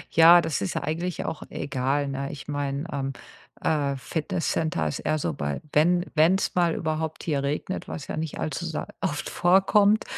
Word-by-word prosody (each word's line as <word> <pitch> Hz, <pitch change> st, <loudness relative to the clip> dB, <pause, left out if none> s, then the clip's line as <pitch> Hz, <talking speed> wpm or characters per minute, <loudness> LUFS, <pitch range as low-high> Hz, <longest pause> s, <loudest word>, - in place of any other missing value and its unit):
Ja, 170 Hz, +2 st, +9 dB
das 160 Hz, -8 st, -2 dB
ist 95 Hz, -, -2 dB
ja -, -, -1 dB
eigentlich 170 Hz, +4 st, -2 dB
auch 160 Hz, -, -4 dB
egal, 140 Hz, +1 st, -1 dB
ne? 140 Hz, 0 st, -3 dB
Ich 140 Hz, -, -9 dB
meine, 145 Hz, 0 st, -2 dB
ähm, 135 Hz, -1 st, -2 dB, 0.5 s
äh, 145 Hz, -3 st, +1 dB
Fitnesscenter 160 Hz, -, -1 dB
ist 75 Hz, -, -3 dB
eher 155 Hz, -, 0 dB
so 85 Hz, -, -1 dB
bei 70 Hz, 0 st, -3 dB
wenn 175 Hz, +4 st, +3 dB
wenn's 170 Hz, +5 st, +3 dB
mal 175 Hz, -2 st, +2 dB
überhaupt 160 Hz, -1 st, -3 dB
hier 145 Hz, -4 st, 0 dB
regnet, 150 Hz, +6 st, -3 dB
was 150 Hz, -, -6 dB
ja -, -, -4 dB
nicht 160 Hz, -1 st, -3 dB
allzu 155 Hz, +2 st, -3 dB
sa 165 Hz, -2 st, -4 dB
oft 150 Hz, -1 st, -2 dB
vorkommt, 200 Hz, +4 st, +4 dB
155 Hz, 175 wpm, -26 LUFS, 140-170 Hz, 0.5 s, Ja